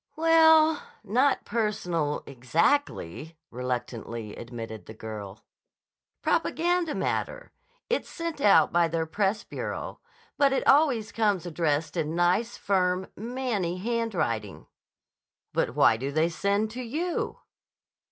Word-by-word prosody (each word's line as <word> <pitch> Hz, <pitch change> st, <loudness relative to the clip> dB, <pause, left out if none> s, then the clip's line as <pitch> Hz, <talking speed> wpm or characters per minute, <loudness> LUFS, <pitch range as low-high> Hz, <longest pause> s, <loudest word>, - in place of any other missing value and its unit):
"Well, 320 Hz, -1 st, +5 dB, 0.2 s
not 255 Hz, +7 st, +2 dB
personal, 180 Hz, -9 st, -1 dB
exactly," 155 Hz, -, -1 dB
reluctantly 120 Hz, -3 st, -4 dB
admitted 115 Hz, -4 st, -8 dB
the 110 Hz, -, -9 dB
girl. 105 Hz, -2 st, -8 dB, 0.8 s
"Propaganda 345 Hz, -1 st, +1 dB
matter. -, -, -2 dB, 0.4 s
It's 485 Hz, -, -1 dB
sent 335 Hz, -4 st, -5 dB
out 180 Hz, -, +5 dB
by 170 Hz, -1 st, +4 dB
their 165 Hz, 0 st, -1 dB
press 200 Hz, +5 st, 0 dB
bureau. -, -, -5 dB, 0.4 s
But 280 Hz, -2 st, +4 dB
it 270 Hz, -, 0 dB
always 265 Hz, -7 st, +4 dB
comes 205 Hz, -6 st, +1 dB
addressed 155 Hz, -3 st, -1 dB
in 155 Hz, +1 st, -1 dB
nice, 180 Hz, +7 st, +1 dB
firm, 185 Hz, -1 st, 0 dB
man 245 Hz, -1 st, -2 dB
ny 175 Hz, 0 st, -2 dB
handwriting." 185 Hz, -, -2 dB, 0.9 s
"But -, -, 0 dB
why 110 Hz, -, +5 dB
do 135 Hz, +4 st, -3 dB
they 155 Hz, +3 st, +2 dB
send 200 Hz, +5 st, 0 dB
to 250 Hz, +3 st, -6 dB
you?" 315 Hz, +9 st, -2 dB
190 Hz, 115 wpm, -27 LUFS, -, 0.9 s, Well